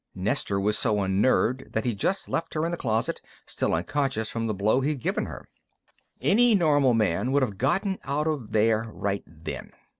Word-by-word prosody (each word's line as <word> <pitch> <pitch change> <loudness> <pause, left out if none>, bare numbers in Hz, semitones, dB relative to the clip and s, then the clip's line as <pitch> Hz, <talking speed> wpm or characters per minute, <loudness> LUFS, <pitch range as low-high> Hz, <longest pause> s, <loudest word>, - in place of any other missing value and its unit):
Nestor 100 +1 -1
was 105 +2 +1
so 105 -4 +2
unnerved 110 +6 +1
that 110 - -1
he 120 - +1
just 185 - -1
left 165 0 -3
her 155 +1 0
in 170 - -1
the - - -1
closet, 115 -7 -1 0.2
still - - -2
unconscious 110 - -1
from 115 -1 -2
the 110 - -1
blow 110 +6 +2
he'd 145 +1 -1
given - - -1
her. - - -9 0.7
"Any 220 - +4
normal 145 - +3
man 110 +3 +1
would 140 -1 +3
have 105 -6 -3
gotten 190 - 0
out 150 +2 -1
of 150 -8 -2
there 110 +1 +2
right 100 -1 -2
then. 80 0 -8
120 Hz, 185 wpm, -26 LUFS, 105-145 Hz, 0.7 s, Any